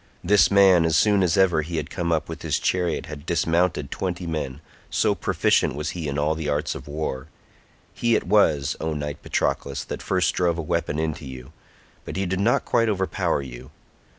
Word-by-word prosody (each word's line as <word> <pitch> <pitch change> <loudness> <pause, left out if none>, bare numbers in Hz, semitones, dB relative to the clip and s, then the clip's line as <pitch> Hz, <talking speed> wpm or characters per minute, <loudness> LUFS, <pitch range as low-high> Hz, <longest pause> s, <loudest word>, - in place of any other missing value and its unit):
This 100 +3 +5
man 95 -4 +6
as 80 -1 +2
soon 105 0 +4
as 90 -2 +2
ever 90 -5 +4
he 80 +2 -5
had 75 -2 -4
come 85 -1 -2
up 80 -1 0
with 80 - -7
his 75 -3 0
chariot 90 -3 -1
had 75 -2 -8
dismounted 85 -4 0
twenty 90 -1 -3
men, 75 -5 -4 0.3
so - - +2
proficient - - +1
was 75 +1 -3
he 85 -4 -5
in 70 0 -3
all 75 +2 +1
the 80 -1 -4
arts 75 +1 -1
of - - -9
war—he 75 - -4
it - - +1
was, 75 -8 +3
O 80 0 -1
knight 75 -1 -5
Patroclus, 70 0 -1
that - - -6
first - - +1
drove 85 -2 +1
a - - -2
weapon 75 0 -1
into 80 -2 -3
you, 65 0 -10 0.5
but - - -7
he 95 +1 -1
did 95 +1 -2
not 115 +5 +2
quite 115 -1 +2
overpower 95 -7 0
you. 65 -1 -10
80 Hz, 195 wpm, -24 LUFS, 75-90 Hz, 0.5 s, man